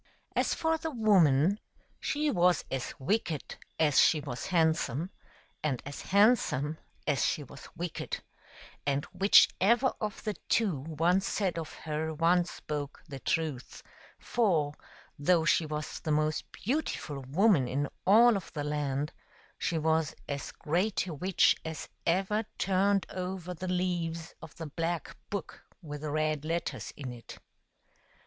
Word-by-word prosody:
As - - +2
for 320 0 +1
the 320 - -3
woman, 195 - +4 0.4
she 300 0 0
was 180 - +3
as 135 -2 -3
wicked 160 0 -1 0.2
as 150 -4 +5
she 155 - +5
was 140 -4 -5
handsome, 160 -1 +1 0.5
and 140 -5 0
as 140 0 -6
handsome 195 - +3 0.3
as 145 -3 +1
she 150 - 0
was 140 +1 -12
wicked, 170 0 -4 0.6
and 140 0 0
whichever 205 +5 +5
of 215 -1 -4
the 215 - -1 0.2
two 200 -11 +2
one 165 +6 +1
said 190 -3 -1
of 160 - -6
her 155 0 -3
one 170 +3 +3
spoke 145 -4 -6
the 140 -3 -7
truth; 155 -4 -2 0.3
for, 170 -11 +1 0.5
though 165 +2 +3
she 165 -2 +3
was 150 0 -4
the 160 - -5
most 155 0 0
beautiful 215 - -2
woman 150 - +3
in 140 +3 -1 0.2
all 230 +4 +7
of 195 - -5
the 145 - -3
land, 150 0 -1 0.5
she 170 - 0
was 160 0 +1
as 140 -1 -4
great 180 +7 0
a 175 - -5
witch 180 +5 +3
as 160 -2 -5 0.2
ever 195 +5 +2
turned 195 +1 +2
over 180 -1 -4
the 185 +2 -6
leaves 175 -3 -1
of 150 - -11
the 165 - -6
black 165 +3 -3
book 200 -1 -5 0.2
with 150 -4 -7
the 155 - -3
red 155 0 0
letters 165 +2 -3
in 135 -4 -5
it. 120 -2 -11
165 Hz, 140 wpm, -30 LUFS, 150-190 Hz, 0.6 s, all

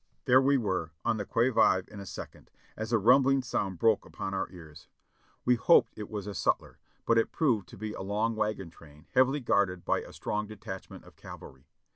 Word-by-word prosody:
There 130 +1 +6
we 140 +1 +3
were 95 - -2
on - - +1
the 100 - -4
qui 120 +2 +2
vive 95 -6 +3
in 105 - -11
a 100 - -8
second, - - -9 0.3
as 110 +1 -5
a 115 - +4
rumbling 130 +5 +4
sound 95 -6 -2
broke 110 +2 +3
upon 95 - -6
our 95 - -2
ears; 75 -4 -13 0.6
we 125 - +5
hoped 125 +8 +4
it 105 -1 -7
was 105 -3 -5
a 105 - -5
sutler, - - -1 0.3
but 115 0 +4
it 115 - 0
proved 115 - +1
to - - -12
be 105 +1 -5
a - - -7
long 105 +4 -1
wagon 105 -5 -2
train 75 -1 -17
heavily 130 +3 +3
guarded 100 -6 +1
by - - +1
a - - -11
strong 105 0 -3
detachment 100 -2 -9
of - - -17
cavalry. 65 0 -12
105 Hz, 205 wpm, -29 LUFS, 95-120 Hz, 0.6 s, There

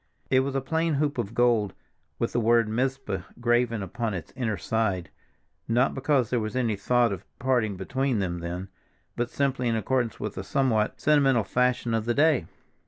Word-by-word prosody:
It 130 - +5
was 135 +1 -1
a 135 - +1
plain 160 +3 0
hoop 145 -2 0
of 115 0 -3
gold, 115 -5 +2 0.4
with - - -2
the 120 - +2
word 115 0 +4
Mizpah 120 -4 -1 0.2
graven 120 -2 +1
upon 115 +1 -3
its 85 -4 -7
inner 115 -6 -1
side, 100 -7 -1 0.6
not 120 +3 +2
because 135 -3 +1
there 125 - +2
was 110 0 -4
any 120 -4 +1
thought 120 +3 +2
of 95 - -7
parting 120 -6 0
between 130 +6 -1
them 90 -3 -2
then, 90 +3 -5 0.5
but 120 0 -1
simply 135 -3 0
in 115 - +1
accordance 120 0 -1
with 105 -3 -4
a - - -4
somewhat 120 -1 +1
sentimental 135 -4 +4
fashion 125 +1 +1
of 110 -1 0
the 120 0 0
day. 145 - +3
120 Hz, 180 wpm, -26 LUFS, 110-130 Hz, 0.6 s, It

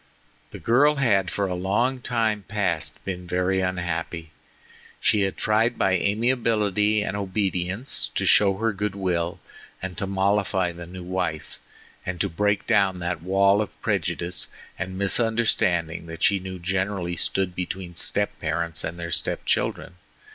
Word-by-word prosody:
The - - -8
girl 145 +6 +4
had 100 -9 +2
for 100 - -1
a 95 - -2
long 105 +9 +1
time 110 -4 0
past 95 -7 -2
been 90 -2 -4
very 90 +2 +1
unhappy. 85 -3 -3 0.7
She 105 - +3
had 95 -1 0
tried 115 +3 +2
by - - +2
amiability 105 0 +2
and 100 - -3
obedience 95 +3 -1
to - - +1
show 100 -2 +5
her 115 +1 +1
goodwill 95 -4 -1 0.4
and 95 -1 -5
to 100 - -2
mollify 95 -1 +1
the 85 0 -9
new 90 +1 -8
wife, 90 -4 -3 0.4
and 90 -1 -4
to 100 - +1
break 105 +4 +1
down 100 -5 +3
that 85 -2 -3
wall 100 +3 +4
of 105 - -6
prejudice 90 +1 0 0.3
and 95 0 -4
misunderstanding 100 -6 +1
that 80 0 -7
she 100 - +4
knew 95 0 -6
generally 95 0 -1
stood 90 +2 -1
between 90 0 -4
step - - 0
parents 85 -1 -1
and 85 - -4
their 85 0 -4
step - - -2
children. 90 - -1
95 Hz, 145 wpm, -25 LUFS, 90-105 Hz, 0.7 s, show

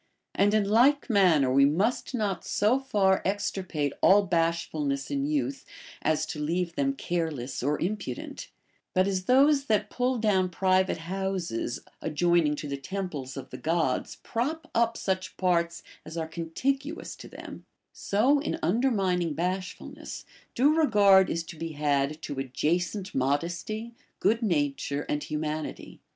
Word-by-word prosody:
x\nd 205 +2 +3
in 215 - +3
like 255 +6 +4
man 180 -8 +5
ner 130 -1 +1
we 140 +1 +6
must 195 - +1
not 205 -5 -1
so 220 +6 +2
far 200 -8 +2
extirpate 190 -7 -2
all 205 +1 +6
bashfulness 165 -5 -1
in 280 0 0
youth 285 -2 -1 0.4
as 155 0 +1
to 155 -1 -6
leave 170 +3 -1
them 275 +8 +1
careless 160 - -3
or 145 +4 0
impudent; 185 -9 -4 0.5
but 185 +1 +4
as 190 -2 -1
those 275 +3 +4
that 210 -4 +1
pull 250 0 0
down 195 -5 +2
private 185 0 +2
houses 175 -8 -3 0.2
adjoining 170 -1 +2
to 150 - -6
the 140 0 -3
temples 150 -6 -5
of 130 -1 -8
the - - -7
Gods 160 -5 0
prop 315 +8 -3
up 230 0 +2
such 185 -1 -2
parts 170 -2 +1 0.2
as 160 +2 -8
are 160 -1 -2
contiguous 265 - -3
to - - -10
them, - - -10 0.3
so 250 +9 +2
in 295 - -2
un 190 +9 +2
dermining 185 - +1
bashfulness, 185 +3 -4 0.3
due 280 +5 +4
regard 205 - +5
is 165 - -1
to 165 - -10
be 165 0 -5
had 145 0 0
to 145 -3 -4
adjacent 175 - -1
modesty, 170 - -2 0.3
good 225 +5 +2
nature, 145 -6 -1
and 150 0 -2
humanity. 155 0 -4
185 Hz, 145 wpm, -27 LUFS, 155-215 Hz, 0.5 s, we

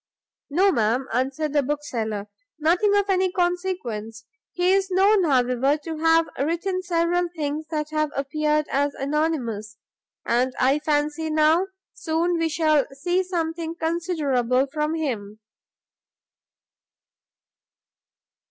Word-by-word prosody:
"No, 375 +7 +3
ma'am," 235 0 +1
answered 270 +5 -1
the 290 - +4
Bookseller, 235 -8 -3 0.3
"nothing 355 +7 +2
of 405 -1 +1
any 375 -1 +2
consequence; 350 - -2 0.3
he 360 +1 +2
is 390 0 +1
known, 385 +1 +4
however, 260 0 +2
to 325 -2 -5
have 325 0 +4
written 345 +6 -1
several 350 0 0
things 305 0 -3
that 305 -1 -3
have 305 -1 0
appeared 300 +2 0
as 285 +1 0
anonymous; 265 -8 -2 0.5
and 250 +2 +1
I 270 +3 +3
fancy, 300 +1 -1
now, 310 +4 +3 0.3
soon, 335 +1 -1
we 330 0 +1
shall 310 -3 +2
see 350 +7 0
something 335 -2 -3
considerable 300 -7 0
from 305 +1 -1
him." 220 -10 -4
310 Hz, 115 wpm, -24 LUFS, 270-345 Hz, 0.5 s, the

